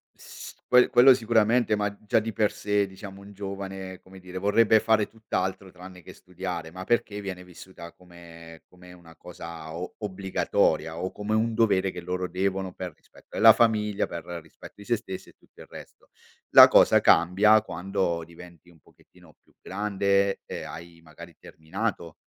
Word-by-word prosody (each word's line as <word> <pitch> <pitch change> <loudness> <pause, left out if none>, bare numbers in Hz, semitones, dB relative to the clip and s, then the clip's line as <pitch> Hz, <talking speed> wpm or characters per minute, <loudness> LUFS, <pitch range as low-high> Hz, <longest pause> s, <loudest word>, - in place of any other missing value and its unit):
S - - -12
quel 125 0 +5
quello 125 +2 +7
sicuramente, 115 -1 +2
ma 105 -1 -2
già 105 - +2
di 110 +1 -5
per 105 +1 +1
sé, 105 -1 -1
diciamo, 95 +1 -11
un 100 +1 -13
giovane, 95 -1 -7
come 95 0 -16
dire, 90 0 -10
vorrebbe 105 +3 +3
fare 110 -2 +2
tutt'altro 95 -4 -4
tranne 90 0 -13
che - - -13
studiare, 90 -3 -7
ma 95 +1 -8
perché 105 -1 -1
viene 95 -2 -7
vissuta 90 -1 -13
come 85 -2 -15
come 90 0 -16
una 85 -2 -17
cosa 80 -1 -10
o 90 +1 -7
obbligatoria 95 -4 -1
o 95 +1 -3
come 105 +1 -3
un 115 +1 0
dovere, 100 -4 +1
che 90 - -8
loro 90 +1 -3
devono 95 +1 -3
per 90 -3 -7
rispetto - - -23
della 115 -1 +7
famiglia, 105 -3 +1
per 85 - -7 0.2
rispetto 80 - -15
di 100 - -13
se 120 +1 +1
stessi 95 -4 -9
e - - -21
tutto - - -20
il - - -13
resto. - - -14 0.4
La - - +11
cosa - - +5
cambia 105 +5 +4
quando 95 -3 -3
diventi 85 0 -15
un 85 -2 -21
pochettino 90 0 -23
più - - -31
grande 100 0 0
e - - -7
hai 85 0 -10
magari 80 -2 -14
terminato 80 +1 -5
95 Hz, 170 wpm, -26 LUFS, 90-105 Hz, 0.4 s, La